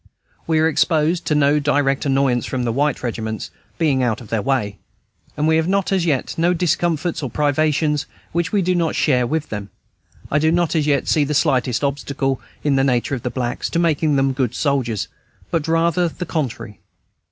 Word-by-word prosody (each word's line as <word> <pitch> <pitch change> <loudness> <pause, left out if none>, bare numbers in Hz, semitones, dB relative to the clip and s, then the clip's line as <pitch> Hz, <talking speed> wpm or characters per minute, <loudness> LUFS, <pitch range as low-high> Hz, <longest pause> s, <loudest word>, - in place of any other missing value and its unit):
We 160 -1 +2
are 160 - +4
exposed 160 +2 +1
to 150 - +2
no 145 0 +3
direct 145 -1 +1
annoyance 135 -3 +1
from 130 -2 -2
the 120 - 0
white 145 +4 0
regiments, 110 -2 -4 0.3
being 145 -6 +2
out 115 -3 0
of 115 -5 -12
their 115 -2 0
way; 105 -6 -1 0.6
and 150 +1 +1
we 160 0 +4
have 160 +3 +1 0.2
as 185 -3 +1
yet 140 -5 0
no 175 +2 +3
discomforts 170 -1 0
or 135 - -3
privations 150 +1 +1 0.2
which 170 0 -1
we 200 -3 +2
do 185 +1 +1
not 170 -2 0
share 125 -5 +2
with 155 +3 -2
them. 105 -2 -5 0.6
I 150 - +3
do 160 +1 +3
not 170 0 +1
as 155 -2 +1
yet 140 -3 +1
see 150 - +3
the 150 +1 -2
slightest 125 -3 +1
obstacle, 140 -1 -1 0.2
in 145 -2 +2
the 135 - +3
nature 125 0 +1
of 130 - -2
the 125 - -2
blacks, 120 -1 -3
to - - -2
making 160 -3 +2
them 135 0 +2
good 130 -4 -1
soldiers, 130 -8 0 0.4
but 165 -2 -1
rather 170 +1 +2
the 180 - -6
contrary. 130 - -4
145 Hz, 195 wpm, -20 LUFS, 130-160 Hz, 0.6 s, are